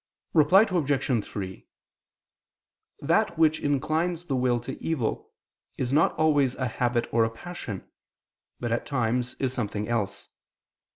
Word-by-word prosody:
Reply 170 +7 +6
Obj. 140 - +1
3: 95 -2 -7 1.3
That 170 - +1
which 160 -1 +4
inclines 155 +5 0
the 140 - -1
will 125 -1 +2
to - - -7
evil, 150 -9 -2 0.5
is 130 +1 -1
not 155 - +4
always 145 -5 +2
a 130 - -1
habit 120 +1 0
or 115 0 +4
a 115 - +1
passion, 115 - -7 0.7
but 120 -1 -3
at 115 - -1
times 125 -2 0
is 130 -2 -1
something 105 -4 -2
else. 115 -4 -2
130 Hz, 130 wpm, -27 LUFS, 120-155 Hz, 1.3 s, Reply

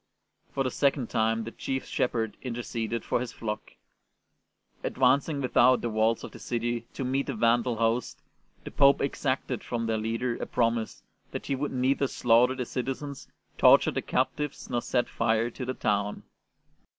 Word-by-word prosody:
For 135 - 0
the 130 - -1
second 140 -2 +1
time 115 0 +1
the 115 - -6
Chief 135 +2 -3
Shepherd 115 -3 -1
interceded 115 -2 -3
for - - +1
his 125 0 -4
flock. 105 -3 -5 1.1
Advancing 140 +3 +2
without 125 0 +4
the 120 - -2
walls 110 +1 +1
of - - -7
the - - -11
city 120 -1 -2
to 135 - -3
meet 135 +2 0
the 135 - -2
Vandal 115 +2 +2
host, 115 +2 0 0.4
the - - -7
Pope 140 0 +5
exacted 130 -3 -1
from 115 -1 -2
their 110 -1 0
leader 115 +2 -1
a - - -5
promise 115 -2 -1 0.3
that - - -6
he 140 - -1
would 145 +2 -2
neither 135 +2 +1
slaughter 125 +1 +3
the 125 -1 -3
citizens, 135 +3 -4 0.3
torture - - +6
the - - -2
captives, 150 -3 -2
nor 120 -1 0
set 120 +1 0
fire 115 +1 +1
to 125 - -6
the 130 - -2
town. 105 -2 -1
120 Hz, 165 wpm, -28 LUFS, 115-130 Hz, 1.1 s, torture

